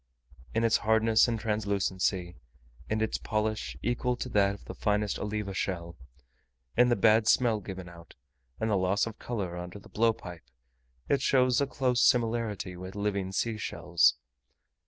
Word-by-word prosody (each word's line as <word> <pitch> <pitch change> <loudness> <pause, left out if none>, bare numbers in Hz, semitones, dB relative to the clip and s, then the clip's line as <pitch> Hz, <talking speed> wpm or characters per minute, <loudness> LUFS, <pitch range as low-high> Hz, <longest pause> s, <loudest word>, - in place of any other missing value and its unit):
In 115 - +2
its 115 -1 +4
hardness 110 +1 +3
and 115 -2 -1
translucency 100 -4 -1 0.5
in 110 0 0
its 110 - -1
polish, 110 - -2
equal 125 +1 0
to 125 - -5
that 100 -3 +2
of - - -16
the - - -7
finest 105 0 0
oliva 105 -1 -3
shell 85 -3 -3 0.8
in 125 0 +5
the 120 - +3
bad 110 +1 +4
smell 115 -4 +3
given 95 -2 -8
out, 85 -1 -14 0.4
and 110 - 0
loss 95 +1 +2
of 115 -1 -8
colour 100 -8 -4
under 90 +2 -7
the 100 - -15
blowpipe 90 - -1 0.6
it 140 - +2
shows 130 -1 +3
a 140 - +1
close 130 -2 0
similarity 115 -7 +1
with 95 +2 -8
living 100 -2 -2
sea 110 +3 -1
shells. 85 -5 +2
105 Hz, 155 wpm, -29 LUFS, 95-115 Hz, 0.8 s, in